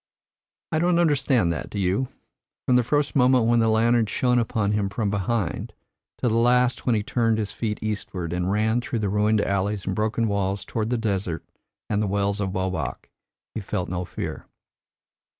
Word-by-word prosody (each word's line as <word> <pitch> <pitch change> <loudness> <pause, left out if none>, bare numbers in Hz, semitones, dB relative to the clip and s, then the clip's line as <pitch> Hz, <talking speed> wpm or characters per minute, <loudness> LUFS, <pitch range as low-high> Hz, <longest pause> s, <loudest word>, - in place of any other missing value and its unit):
I 155 - +1
don't 175 +1 +3
understand 140 - +3
that, 80 - -4
do - - -6
you? 100 +7 +1 0.6
From 125 - +3
the 125 - +5
first 145 +5 0
moment 125 -3 +4
when 120 +1 +3
the 115 - +3
lantern 115 +1 +3
shone 125 +3 +2
upon 110 -3 0
him 105 -2 0
from 100 0 -1
behind, 100 -1 -2 0.4
to - - 0
the 110 - +1
last 125 +2 +2
when 120 - +4
he 105 - 0
turned 115 0 +1
his 105 -2 -2
feet 105 0 -3
eastward, 95 -5 -3
and 90 +1 -1
ran 110 +4 +1
through 120 - -3
the 105 -3 -1
ruined 105 +1 +2
alleys 100 0 -1
and 95 - -2
broken 110 +1 0
walls 100 -1 -1
toward 110 -1 -2
the 125 - +1
desert 95 -6 -2 0.4
and 105 0 0
the 105 - 0
Wells 100 +1 0
of 95 -1 -2
Obak, 95 0 -3 0.4
he 110 - -4
felt 90 -2 -3
no 90 0 -2
fear." - - -6
110 Hz, 185 wpm, -24 LUFS, 100-120 Hz, 0.6 s, the